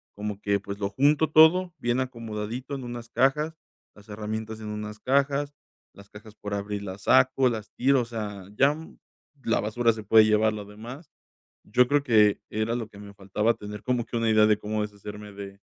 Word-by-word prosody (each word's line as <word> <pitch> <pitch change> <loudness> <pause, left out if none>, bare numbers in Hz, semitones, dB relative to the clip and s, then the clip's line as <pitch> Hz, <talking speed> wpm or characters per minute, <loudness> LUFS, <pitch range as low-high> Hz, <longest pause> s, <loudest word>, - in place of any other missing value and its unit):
como 105 0 -5
que, 100 -1 +1
pues, 100 +1 -7
lo 100 -1 -1
junto 145 +7 +2
todo, 170 +3 +5
bien 120 +1 0
acomodadito 115 +1 -5
en 135 - -6
unas 120 -1 -7
cajas, 150 +7 +1 0.4
las 105 +1 -18
herramientas 110 +1 -5
en 110 - -7
unas 105 0 -6
cajas, 140 +2 +1 0.4
las 100 0 -16
cajas 105 +1 -13
por 105 -1 -6
abrir 100 0 -4
las 95 0 -8
saco, 130 0 +4
las 110 -2 -5
tiro, 135 0 +3
o - - -3
sea, 105 -5 -6
ya, 140 +5 +4
mm, 160 +1 -11 0.5
la 115 - +1
basura 115 +2 +1
se 110 -1 -8
puede 110 +1 +6
llevar 110 0 +3
lo 105 -1 -6
demás. 115 - -11 0.5
Yo 125 +4 +3
creo 145 0 +2
que 105 -6 +4
era 110 +2 -1
lo 115 -3 -4
que 100 - -14
me 100 0 -11
faltaba 100 +3 0
tener 105 0 -8
como 125 -2 0
que - - -7
una 115 -1 +1
idea 110 -1 +5
de 105 - +3
cómo 105 +1 -3
deshacerme 105 0 -7
de 100 0 -9
110 Hz, 200 wpm, -26 LUFS, 105-125 Hz, 0.5 s, puede